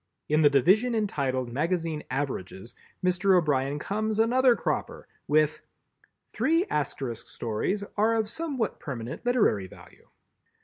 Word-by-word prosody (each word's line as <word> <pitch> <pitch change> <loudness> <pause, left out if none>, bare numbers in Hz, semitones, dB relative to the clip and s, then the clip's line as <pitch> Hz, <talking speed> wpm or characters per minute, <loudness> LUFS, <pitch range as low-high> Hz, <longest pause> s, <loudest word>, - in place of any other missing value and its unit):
In 155 +1 +3
the 145 - +7
division 195 - +3
entitled 130 - -1
Magazine 165 +1 -1
Averages, 125 -6 -4 0.3
Mr. 185 +1 +3
O'Brien 145 -4 +1
comes 215 +6 -2
another 245 +2 +4
cropper - - -3 0.2
with 155 0 +2 0.7
"Three 330 +4 +2
Asterisk 135 -5 -3
stories 120 - -2
are 220 +2 +3
of 220 -2 0
somewhat 275 -4 -3
permanent 130 - -6
literary 205 - +2
value." - - -17
160 Hz, 120 wpm, -27 LUFS, 135-220 Hz, 0.7 s, the